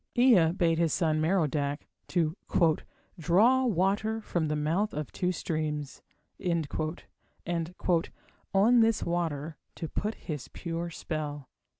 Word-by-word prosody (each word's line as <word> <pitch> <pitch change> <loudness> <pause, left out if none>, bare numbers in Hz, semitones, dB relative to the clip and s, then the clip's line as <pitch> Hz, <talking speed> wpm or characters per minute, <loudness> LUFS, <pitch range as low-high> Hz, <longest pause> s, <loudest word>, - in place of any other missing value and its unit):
Ea 225 -10 +6
bade 170 -3 +2
his 165 -2 +2
son, 155 -3 +1
Merodach, 150 -4 0 0.2
to 165 -3 0 0.8
"draw 220 +11 +4
water 205 +3 +1
from 175 -7 -1
the 150 - 0
mouth 165 +8 0
of 150 -2 -4
two 180 0 0
streams", 155 -4 -3 0.4
and 170 -5 0 1.8
"on 220 +6 +5
this 225 -1 +3
water 160 -3 -2 0.2
to 165 - -4
put 210 +7 -2
his 150 -6 -6
pure 170 0 -4
spell". 150 -4 -5
170 Hz, 115 wpm, -29 LUFS, 155-195 Hz, 1.8 s, Ea